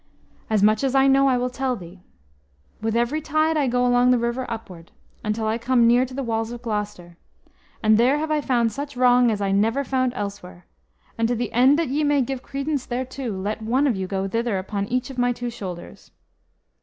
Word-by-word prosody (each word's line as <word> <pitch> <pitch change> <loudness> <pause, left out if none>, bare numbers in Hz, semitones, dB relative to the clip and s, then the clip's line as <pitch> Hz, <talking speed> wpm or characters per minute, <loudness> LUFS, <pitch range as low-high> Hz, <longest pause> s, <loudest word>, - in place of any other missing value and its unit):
"As 215 -2 +2
much 215 +4 +3
as 270 0 0
I 270 0 +5
know 275 0 +4
I 255 -2 +3
will 250 0 -1
tell 260 0 -1
thee. 180 -2 -11 0.8
With 225 0 -1
every 240 +7 0
tide 310 +1 +1
I 290 -3 +1
go 245 0 +1
along 245 0 +4
the 250 - +5
river 235 +2 -2
upward, 185 -7 -8 0.3
until 215 +1 -2
I 220 +2 -1
come 240 0 +3
near 245 +2 +4
to 255 - -12
the 275 - -3
walls 225 -1 -2
of 240 0 -8
Gloucester, 210 -6 -4 0.7
and 215 0 +4
there 255 +5 +4
have 310 +1 -3
I 305 -1 +1
found 240 -4 +1
such 280 +2 -6
wrong 250 -1 +5
as 210 -2 -1
I 195 -1 0
never 225 +7 +1
found 255 -2 0
elsewhere; 200 -3 -7 0.5
and 225 - +2
to 240 - 0
the 235 0 -3
end 260 +4 +5
that 330 -4 -1
ye 295 +3 0
may 290 -2 +2
give 260 +1 -4
credence 275 0 -3
thereto, 255 0 -4
let 210 +3 -3
one 250 +6 +1
of 260 -6 +2
you 190 -1 -3
go 195 0 -2
thither 230 0 -1
upon 200 +1 -3
each 250 +3 -2
of 255 - -7
my 245 0 +2
two 245 0 -5
shoulders." 180 -6 -9
240 Hz, 215 wpm, -23 LUFS, 215-265 Hz, 0.8 s, I